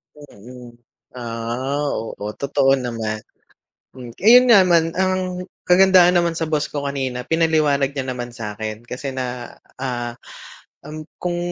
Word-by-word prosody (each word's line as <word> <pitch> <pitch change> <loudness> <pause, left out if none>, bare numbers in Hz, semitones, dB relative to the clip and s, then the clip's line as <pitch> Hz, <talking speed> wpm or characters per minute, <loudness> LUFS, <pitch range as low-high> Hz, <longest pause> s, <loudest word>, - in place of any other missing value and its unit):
Mm, 125 -3 -13 0.5
ah, 120 +4 -3
oo, 115 - -4 0.2
totoo 140 -1 +1
naman. 115 -3 -3 1.0
Ayun 245 +4 +8
nga 215 -6 +7
naman 165 -2 +2
ang 185 -1 -1 0.2
kagandahan 180 -1 +6
naman 170 -1 +3
sa 165 0 -3
boss 150 -1 -1
ko 145 -1 -3
kanina 130 -3 -3
pinaliwanag 155 -4 +2
niya 135 -2 -4
naman 125 -1 -5
sa'kin 110 0 -6
kasi 135 +3 -5
na, 125 -2 -6 0.2
ah, 120 -2 -4 0.7
um, 155 +1 -9
kung 175 -1 -3
140 Hz, 125 wpm, -21 LUFS, 120-165 Hz, 1.0 s, Ayun